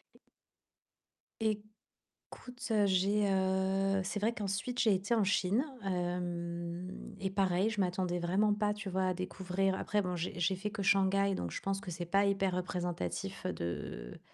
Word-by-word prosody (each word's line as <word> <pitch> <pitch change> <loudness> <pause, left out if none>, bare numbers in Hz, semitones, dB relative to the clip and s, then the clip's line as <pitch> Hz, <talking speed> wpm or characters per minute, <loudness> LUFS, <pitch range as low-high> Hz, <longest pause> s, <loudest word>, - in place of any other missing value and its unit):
E - - -20 1.2
écoute, 215 -2 +1 1.1
heu, 210 -2 +4
j'ai 200 +2 +3
heu, 190 0 +2
c'est 200 +2 -2
vrai 215 +3 +2
qu'ensuite 210 +3 -2
j'ai 220 -4 +5
été 195 +5 +1
en 220 - +3
Chine, 200 +5 +2 0.2
heu 175 0 -3
et 195 -1 -2
pareil, 190 +1 +2
je 210 - 0
m'attendais 180 -1 0
vraiment 195 +5 +2
pas, 210 0 +1
tu 210 -2 -5
vois, 185 0 +1
à 185 - +2
découvrir 185 +1 -1
après 205 +1 0
bon 180 0 -2
j'ai 175 0 -3
j'ai 185 +2 +2
fait 200 +3 -3
que 205 -1 -4
Shanghai, 195 0 +4
donc 85 - -2
je - - -4
pense 195 0 -1
que 185 - -7
c'est 175 0 -4
pas 195 +4 +3
hyper 195 -2 +1
représentatif 175 - -3
de - - -4
190 Hz, 165 wpm, -33 LUFS, 180-200 Hz, 1.2 s, j'ai